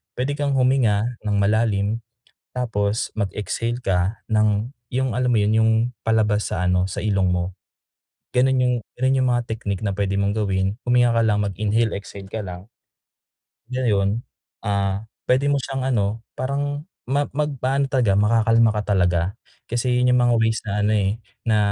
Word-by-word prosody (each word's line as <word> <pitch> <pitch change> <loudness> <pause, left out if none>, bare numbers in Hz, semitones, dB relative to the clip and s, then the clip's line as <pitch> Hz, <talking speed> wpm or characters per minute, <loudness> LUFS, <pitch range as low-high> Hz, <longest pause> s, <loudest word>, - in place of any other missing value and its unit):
puwede 130 +3 -1
kang 145 -1 -1
huminga 125 -3 +2
ng 105 -1 0
malalim 105 +1 +1 0.5
tapos 110 -3 -1
mag-exhale 110 +3 -2
ka 95 +3 0
ng, 110 +3 +1 0.2
yung 130 -2 -1
alam 125 +1 +1
mo 115 - +3
yun, 105 +1 +2
yung 110 - +4 0.3
palabas 110 -2 +1
sa 90 0 -1
ano, 90 0 +2
sa - - -5
ilong 100 -3 +1
mo, 90 +1 -1 0.8
ganun 130 +1 +4
yung 125 0 +2 0.3
ganun 130 +1 +3
yung 130 - +2
mga 120 0 +1
technique 105 -4 -3
na 100 - 0
puwede 100 -1 -1
mong 100 +2 0
gawin. 95 -1 0
Huminga 120 -1 +3
ka 115 - +4
lang 105 -1 +2
mag-inhale, 105 +3 0
exhale 100 -1 -10
ka 110 +3 -4
lang. 90 +2 -8 1.0
Ngayon, 110 -4 +1 0.5
ah, 100 +1 -1 0.2
puwede 130 +3 +3
mo 145 - +3
siyang 135 0 -3
ano, 105 +1 0 0.2
parang 145 +2 -2 0.2
ma 140 +3 +1
magpaano 140 -2 0
talaga, 125 -7 +2
makakalma 115 +1 +4
ka 105 - +1
talaga. 90 -2 +2 0.5
Kasi 125 +1 0
yun 125 0 +3
yung 125 - +4
mga 120 0 +3
ways 115 0 +2
na - - -2
ano, 105 - +2
eh, 100 -2 +2 0.4
na 110 -1 +3
110 Hz, 165 wpm, -22 LUFS, 100-125 Hz, 1.0 s, yung